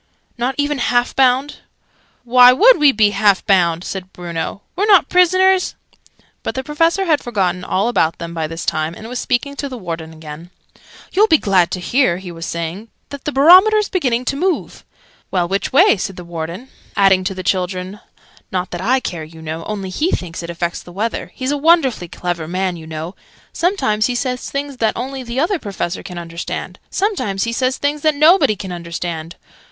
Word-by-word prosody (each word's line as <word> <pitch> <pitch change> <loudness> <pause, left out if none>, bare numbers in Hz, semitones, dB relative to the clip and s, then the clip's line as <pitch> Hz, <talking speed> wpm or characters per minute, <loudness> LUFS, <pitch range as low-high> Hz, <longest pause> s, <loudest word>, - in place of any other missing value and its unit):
"Not 245 +2 -2
even 290 -1 0
half 245 0 +1
bound?" 265 +2 +2 0.7
"Why 250 +1 +7
would 445 - +6
we 295 -2 +6
be 210 -4 +3
half 205 -2 +2
bound?" 175 -3 +2
said 190 -1 -6
Bruno. 175 +2 -5
"We're 405 +4 0
not 395 -4 +5
prisoners!" 370 +1 +3 0.7
But - - -4
the 265 - -3
Professor 330 +7 +1
had 310 -4 +2
forgotten 185 -6 -1
all 195 +4 0
about 165 -9 +1
them 170 -1 -7
by 160 -2 -2
this 165 +1 -6
time, 155 +2 -1
and 220 - -10
was 250 +1 -4
speaking 280 +3 -1
to 280 - -4
the 255 - -7
Warden 165 -5 -6
again. 160 +1 -10 0.6
"You'll 415 +4 +4
be 320 - +5
glad 190 -8 +2
to 185 - -2
hear," 185 -1 +1
he 185 -1 -8
was 165 -1 -7
saying, 170 +6 -4 0.2
"that 280 -1 -9
the 300 - -1
Barometer's 375 +9 +6
beginning 255 -9 0
to 275 - -1
move 360 +4 -2 0.2
" - - -33
"Well, 180 -2 0
which 195 +2 -2
way?" 260 -5 +5
said 190 +1 -4
the 180 - -9
Warden 170 +8 -6 0.3
adding, 195 -2 +4
to 190 - -2
the 185 - -6
children, 185 +2 -2 0.5
"Not 180 -1 -2
that 175 - -5
I 255 +7 +2
care, 170 -8 -5
you 160 +1 -12
know. 160 +1 -6
Only 195 -3 -4
he 310 - 0
thinks 175 - -3
it 170 - -7
affects 170 0 -3
the 175 - -13
weather. 215 +6 -3
He's 260 +1 -2
a 290 - 0
wonderfully 280 - +3
clever 170 -2 -4
man, 185 +1 -1
you 160 -2 -10
know. 160 +3 -6 0.4
Sometimes 275 - +1
he 250 - -2
says 250 0 -3
things 280 -1 -4
that 225 -2 0
only 265 +3 -4
the 245 +1 -4
Other 345 +5 +1
Professor 195 - -4
can 180 -2 -9
understand. 170 0 -6
Sometimes 370 - -1
he 230 - -2
says 255 +2 0
things 290 +1 -1
that 310 0 +2
nobody 305 - +5
can 190 -2 -7
understand! 170 -1 -5
210 Hz, 195 wpm, -18 LUFS, 175-280 Hz, 0.7 s, Why